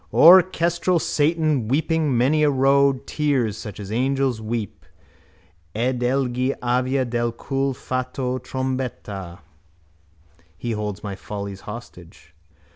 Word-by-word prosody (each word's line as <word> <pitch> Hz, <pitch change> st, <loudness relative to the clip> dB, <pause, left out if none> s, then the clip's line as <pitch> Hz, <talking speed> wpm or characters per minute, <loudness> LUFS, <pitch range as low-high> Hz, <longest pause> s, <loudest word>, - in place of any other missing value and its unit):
Orchestral 175 Hz, 0 st, +5 dB
Satan, 155 Hz, -5 st, +1 dB
weeping 155 Hz, 0 st, +1 dB
many 140 Hz, +6 st, +3 dB
a 150 Hz, -, +4 dB
rood 135 Hz, 0 st, +3 dB
Tears 135 Hz, -8 st, 0 dB
such 105 Hz, -1 st, -8 dB
as 100 Hz, -1 st, -7 dB
angels 130 Hz, 0 st, 0 dB
weep. 110 Hz, -2 st, -4 dB, 0.9 s
Ed 125 Hz, +3 st, 0 dB
egli 130 Hz, +1 st, 0 dB
avea 125 Hz, +2 st, 0 dB
del 120 Hz, 0 st, -1 dB
cul 135 Hz, +3 st, -2 dB
fatto 130 Hz, 0 st, -3 dB
trombetta. 125 Hz, -10 st, -5 dB, 1.2 s
He 120 Hz, +6 st, -4 dB
holds 105 Hz, -2 st, -4 dB
my 100 Hz, -2 st, -4 dB
follies 100 Hz, -1 st, -7 dB
hostage. 105 Hz, -7 st, -11 dB
130 Hz, 110 wpm, -22 LUFS, 110-140 Hz, 1.2 s, Orchestral